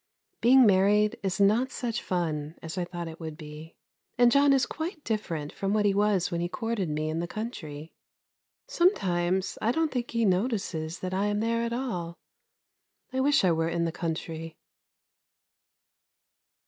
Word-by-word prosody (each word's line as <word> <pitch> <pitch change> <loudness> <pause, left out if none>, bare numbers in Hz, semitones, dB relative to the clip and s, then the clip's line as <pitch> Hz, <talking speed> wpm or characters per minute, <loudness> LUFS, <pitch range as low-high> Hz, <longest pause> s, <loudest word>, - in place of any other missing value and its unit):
Being 255 +2 +7
married 205 +1 +3
is 195 0 -2
not 215 +6 +4
such 240 -2 -3
fun 160 -4 -2
as 160 -1 -6
I 180 -2 -1
thought 175 -1 -6
it 160 0 -9
would 160 -2 -6
be, 155 0 -10 0.4
and 245 -1 +6
John 280 +1 +5
is 270 -1 +4
quite 320 0 -5
different 170 -9 -3
from 195 +1 -1
what 210 -1 +2
he 200 - +3
was 200 -3 +2
when 170 0 -1
he 175 - -1
courted 225 -5 -2
me 155 +1 -2
in 160 +1 -2
the 170 - -2
country. 160 -8 -6 0.7
Sometimes 190 - +1
I 225 - +2
don't 320 +2 0
think 245 -2 -2
he 230 -1 +1
notices 185 -5 -1
that 185 0 -3
I 195 +2 +1
am 205 0 0
there 230 +1 0
at 235 0 -2
all. 180 -10 -3 1.0
I 260 - 0
wish 280 -1 +3
I 180 - +4
were 165 0 +1
in 170 0 0
the 165 - -1
country. 165 -1 -5
190 Hz, 170 wpm, -28 LUFS, 165-230 Hz, 1.0 s, Being